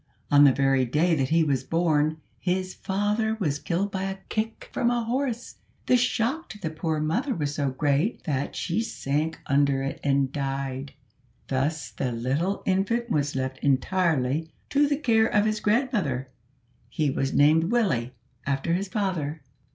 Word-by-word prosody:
On 145 Hz, 0 st, +8 dB
the 140 Hz, -, +7 dB
very 135 Hz, 0 st, +2 dB
day 150 Hz, +8 st, +2 dB
that 135 Hz, -4 st, +1 dB
he 165 Hz, 0 st, +4 dB
was 135 Hz, -4 st, 0 dB
born 155 Hz, -1 st, +1 dB, 0.2 s
his 185 Hz, 0 st, -1 dB
father 210 Hz, +3 st, 0 dB
was 145 Hz, -7 st, 0 dB
killed 180 Hz, +7 st, -1 dB
by 190 Hz, 0 st, -2 dB
a 195 Hz, 0 st, -3 dB
kick 220 Hz, +1 st, -3 dB
from 240 Hz, -2 st, +2 dB
a 240 Hz, -1 st, 0 dB
horse. 245 Hz, 0 st, -2 dB, 0.3 s
The 255 Hz, -, +4 dB
shock 250 Hz, +5 st, 0 dB
to 215 Hz, -, -8 dB
the 160 Hz, -5 st, -3 dB
poor 160 Hz, -1 st, -2 dB
mother 220 Hz, -, 0 dB
was 145 Hz, -4 st, -2 dB
so 145 Hz, -2 st, 0 dB
great, 145 Hz, -, 0 dB
that 140 Hz, -2 st, -2 dB
she 185 Hz, +5 st, -1 dB
sank 155 Hz, -7 st, -2 dB
under 140 Hz, -1 st, +2 dB
it 135 Hz, -, -4 dB
and 140 Hz, -1 st, +2 dB
died. 135 Hz, -1 st, -3 dB, 0.6 s
Thus 135 Hz, -2 st, -1 dB
the 125 Hz, +4 st, -2 dB
little 135 Hz, +12 st, -1 dB
infant 225 Hz, +5 st, 0 dB
was 145 Hz, -4 st, 0 dB
left 130 Hz, 0 st, -2 dB
entirely 155 Hz, 0 st, +1 dB, 0.2 s
to 290 Hz, 0 st, +4 dB
the 285 Hz, 0 st, +1 dB
care 225 Hz, -6 st, +3 dB
of 210 Hz, -1 st, +2 dB
his 215 Hz, 0 st, 0 dB
grandmother. 210 Hz, -, 0 dB, 0.6 s
He 145 Hz, +3 st, 0 dB
was 135 Hz, 0 st, -1 dB
named 155 Hz, +3 st, +4 dB
Willie, 165 Hz, -, +1 dB, 0.3 s
after 140 Hz, +4 st, 0 dB
his 195 Hz, +3 st, -1 dB
father. 175 Hz, -8 st, -2 dB
160 Hz, 165 wpm, -26 LUFS, 140-210 Hz, 0.6 s, On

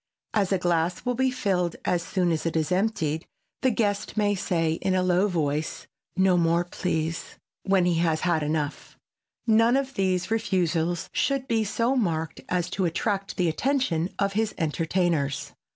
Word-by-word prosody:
As 200 Hz, -3 st, +1 dB
a 195 Hz, -, +3 dB
glass 175 Hz, -1 st, 0 dB
will 250 Hz, -, +1 dB
be 260 Hz, +2 st, +2 dB
filled 190 Hz, -9 st, 0 dB
as 175 Hz, -, +1 dB
soon 180 Hz, -1 st, 0 dB
as 160 Hz, 0 st, -1 dB, 0.2 s
emptied, 180 Hz, -5 st, 0 dB, 0.3 s
the 260 Hz, -, +4 dB
guest 205 Hz, -3 st, -1 dB
may 205 Hz, -1 st, +3 dB
say 165 Hz, -4 st, 0 dB
in 190 Hz, -, +1 dB
a 185 Hz, -, +2 dB
low 185 Hz, +2 st, +3 dB
voice, 155 Hz, -4 st, -2 dB, 0.3 s
"No 190 Hz, -1 st, +4 dB
more, 170 Hz, 0 st, +3 dB
please!" 165 Hz, -2 st, -3 dB, 0.2 s
when 190 Hz, -2 st, +2 dB
he 170 Hz, -2 st, +2 dB
has 160 Hz, -2 st, +1 dB
had 170 Hz, -3 st, +1 dB
enough. 150 Hz, -1 st, -3 dB, 0.5 s
None 230 Hz, +2 st, +4 dB
of 275 Hz, 0 st, -2 dB
these 185 Hz, -1 st, 0 dB
refusals 175 Hz, -6 st, 0 dB
should 275 Hz, -1 st, 0 dB
be 225 Hz, -2 st, +2 dB
so 230 Hz, +5 st, 0 dB
marked 165 Hz, -9 st, -1 dB
as 180 Hz, -1 st, 0 dB
to 190 Hz, -1 st, 0 dB
attract 195 Hz, +3 st, -1 dB
the 180 Hz, -, +2 dB
attention 185 Hz, -, 0 dB
of 200 Hz, -1 st, 0 dB
his 220 Hz, +1 st, 0 dB
entertainers. 160 Hz, -2 st, 0 dB
180 Hz, 160 wpm, -26 LUFS, 165-210 Hz, 0.5 s, the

